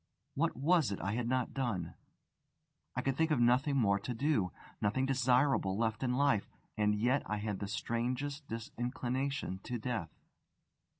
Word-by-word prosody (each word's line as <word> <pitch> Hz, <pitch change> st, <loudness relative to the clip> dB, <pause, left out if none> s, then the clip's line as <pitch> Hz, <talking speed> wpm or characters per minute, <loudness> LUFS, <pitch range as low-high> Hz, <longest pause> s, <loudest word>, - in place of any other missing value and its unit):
What 160 Hz, +1 st, 0 dB
was 155 Hz, -, +3 dB
it 100 Hz, -, -3 dB
I 100 Hz, -, -2 dB
had 115 Hz, +2 st, -1 dB
not 130 Hz, -1 st, 0 dB
done? 115 Hz, -11 st, -2 dB, 1.0 s
I 125 Hz, -, -1 dB
could 135 Hz, -1 st, +1 dB
think 160 Hz, +3 st, +2 dB
of 150 Hz, -5 st, +2 dB
nothing 130 Hz, +4 st, +3 dB
more 100 Hz, -5 st, +3 dB
to 125 Hz, -, -4 dB
do, 115 Hz, -, +1 dB, 0.3 s
nothing 120 Hz, +6 st, +1 dB
desirable 130 Hz, -6 st, +2 dB
left 110 Hz, -1 st, 0 dB
in 125 Hz, -2 st, +1 dB
life; 135 Hz, -7 st, +2 dB, 0.3 s
and 105 Hz, 0 st, +2 dB
yet 125 Hz, +6 st, +2 dB
I 105 Hz, -, -1 dB
had 105 Hz, -1 st, -3 dB
the 100 Hz, -, -3 dB
strangest 130 Hz, +7 st, -2 dB
disinclination 120 Hz, 0 st, -3 dB
to 125 Hz, +3 st, -4 dB
death. 110 Hz, -6 st, -3 dB
125 Hz, 160 wpm, -34 LUFS, 110-135 Hz, 1.0 s, was